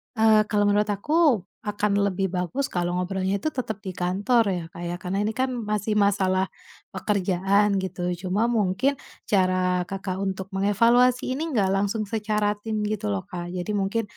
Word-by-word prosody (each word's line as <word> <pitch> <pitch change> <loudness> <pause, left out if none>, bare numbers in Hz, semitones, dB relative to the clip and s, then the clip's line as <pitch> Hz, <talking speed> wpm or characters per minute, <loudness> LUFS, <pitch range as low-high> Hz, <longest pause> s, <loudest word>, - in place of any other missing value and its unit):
Eee, 220 -1 +5
kalau 205 -1 +3
menurut 205 +1 +2
aku, 295 - +3 0.2
akan 210 0 -1
lebih 195 -1 0
bagus 185 +10 -1
kalau 175 0 -1
ngobrolnya 190 +2 -1
itu 310 +10 -3
tetap 225 -5 -3
di 190 - -4
kantor 200 +6 +1
ya 175 -3 -2
Kak 165 +1 -11
ya, 175 0 -3
karena 185 +2 -2
ini 210 - 0
kan 255 +3 -1
masih 210 -2 -2
masalah 190 -2 +2 0.4
pekerjaan 200 +1 +1
gitu. 180 -1 -3
Cuma 195 +6 0
mungkin, 230 +5 +1 0.3
cara 185 -2 +2
Kakak 190 0 -4
untuk 190 -1 -3
mengevaluasi 230 +7 +3
ini 320 0 -3
enggak 200 -5 +2
langsung 200 +3 0
secara 210 -1 0
tim 215 0 -3
gitu 215 0 -2
loh 195 - -2
Kak, 175 -1 -6
jadi 180 +3 -3
mungkin, 200 +4 0
200 Hz, 165 wpm, -25 LUFS, 185-215 Hz, 0.4 s, Eee